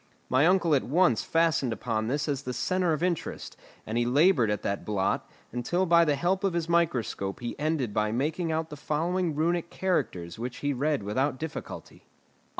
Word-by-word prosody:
My 130 +5 +4
uncle 175 -3 +3
at 140 - +4
once 145 - +2
fastened 165 -6 +1
upon 110 0 -2
this 145 +5 -1
as 140 -3 -1
the 125 -2 -5
centre 185 -2 +1
of 155 +1 -1
interest, 180 -3 -2 0.3
and 110 +2 -1
he 120 - +1
laboured 140 - +4
at 105 -1 -2
that 100 - -2
blot, 100 -2 -1 0.2
until 150 +10 0
by 170 -1 +5
the 150 -2 +2
help 180 +6 0
of 195 -3 +1
his 170 -1 -1
microscope 125 -12 0
he 120 -1 -4
ended 145 -7 -1
by 105 0 +1
making 155 +8 -1
out 160 0 -2
the - - -5
following 165 +3 -1
Runic 170 +2 0
characters 90 - -2
which 120 +1 -5
he 145 - +2
read 145 -2 0
without 130 +7 0
difficulty. 160 +1 -8
150 Hz, 185 wpm, -28 LUFS, 120-170 Hz, 0.3 s, by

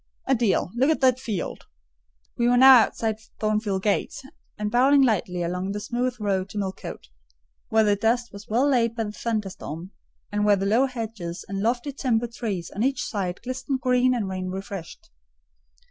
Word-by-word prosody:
"Adèle, 235 -8 +2
look 255 +5 +2
at 315 - +2
that 255 -1 +4
field." 220 -8 -4 0.7
We 235 - +1
were 245 0 +4
now 260 0 +9
outside 220 -1 0 0.2
Thornfield 215 -3 0
gates, 210 +5 -1 0.3
and 210 0 -2
bowling 270 +4 +5
lightly 180 -7 0
along 180 +3 -2
the 205 - -3
smooth 245 +3 -2
road 195 -2 -1
to 210 - -8
Millcote, 190 - -5 0.6
where 220 0 +4
the 205 -1 +3
dust 230 +3 0
was 200 +1 -10
well 245 +6 +2
laid 235 -4 +2
by 225 - -1
the 210 - -5
thunderstorm, 195 -6 -4 0.4
and, 205 0 0
where 210 -1 +5
the 195 0 -2
low 230 +7 +3
hedges 220 -9 -6
and 195 0 -4
lofty 240 +6 0
timber 245 -4 0
trees 220 -7 -4
on 205 - -2
each 265 +1 +1
side 190 -4 -3
glistened 260 +1 -3
green 250 0 +3
and 220 -5 -2
rain 185 -1 -4
refreshed. 190 -2 -7
220 Hz, 175 wpm, -25 LUFS, 195-245 Hz, 0.7 s, now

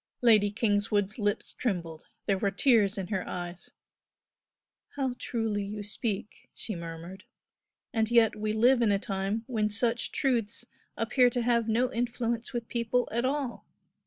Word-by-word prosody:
Lady 215 -4 +6
Kingswood's 205 -1 0
lips 205 -1 -1
trembled; 170 -8 -3 0.2
there 195 -2 +1
were 200 - +2
tears 205 -1 +3
in 190 -2 -4
her 190 -4 -1
eyes. 175 0 -6 1.3
"How 265 -3 0
truly 225 -3 -1
you 205 +1 -5
speak!" 210 0 -4
she 215 - -4
murmured 170 +3 -8 0.7
"And 220 -2 +1
yet 230 -2 +5
we 215 0 -2
live 240 +4 +4
in 225 -3 +4
a 200 - +3
time 195 +1 -2
when 220 -4 0
such 230 +2 +1
truths 235 -4 0 0.3
appear 245 +2 +4
to 245 -1 -1
have 235 -1 +2
no 245 +3 +1
influence 235 0 -2
with 235 -2 -4
people 240 +1 0
at 235 +2 0
all. 275 -2 -2
220 Hz, 150 wpm, -29 LUFS, 200-240 Hz, 1.3 s, Lady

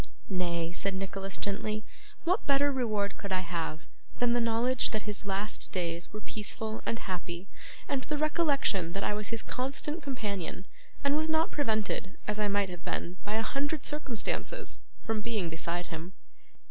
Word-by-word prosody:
'Nay,' 170 -3 +1
said 190 +2 +1
Nicholas 195 0 -2
gently, 215 +2 -1 0.4
'what 365 +5 +2
better 285 0 +5
reward 215 -6 +1
could 200 -2 -4
I 185 -1 +3
have, 170 -3 -2 0.4
than 245 -1 +4
the 240 - +4
knowledge 235 +2 +3
that 215 -2 -1
his 210 -1 0
last 200 +2 0
days 170 -2 -1
were 215 - -4
peaceful 215 +1 -3
and 230 - +2
happy, 180 -2 -4 0.4
and 275 -2 +1
the 300 +3 -1
recollection 285 - +3
that 195 - -1
I - - +2
was 210 0 -2
his 230 -1 +1
constant 280 +5 -1
companion, 205 - -2 0.4
and 280 0 +4
was 310 +1 +2
not 320 +4 +3
prevented, 215 -7 0
as 210 0 +1
I 210 - +3
might 200 -1 +3
have 175 -1 -7
been 180 +2 -2
by 210 +1 -1
a 225 - +2
hundred 285 +5 0
circumstances, 295 - 0 0.3
from 220 -1 +1
being 210 -7 0
beside 170 +1 -2
him? 165 +4 -5
210 Hz, 170 wpm, -32 LUFS, 190-260 Hz, 0.4 s, better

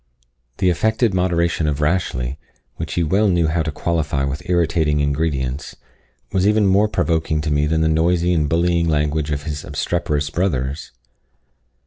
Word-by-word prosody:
The 95 -2 +2
affected 110 +4 +1
moderation 85 -3 +1
of 75 -1 -1
Rashleigh, 75 -6 -1 0.4
which - - -5
he 85 - +1
well 95 +7 +2
knew 85 -3 +2
how 80 +1 0
to 80 0 -2
qualify 75 -3 -1
with 70 +1 -3
irritating 80 -4 +1
ingredients, 70 -2 -2 0.6
was 95 +1 +2
even 105 0 +3
more 100 +2 +4
provoking 80 -4 0
to 75 0 -2
me 75 0 +2
than 80 +1 +1
the 80 - +2
noisy 85 +2 +2
and 75 -4 +1
bullying 85 +1 +1
language 75 0 0
of 75 -1 -2
his 75 -1 -5
obstreperous 75 -1 -2
brothers. 75 -5 -2
80 Hz, 155 wpm, -20 LUFS, 75-90 Hz, 0.6 s, more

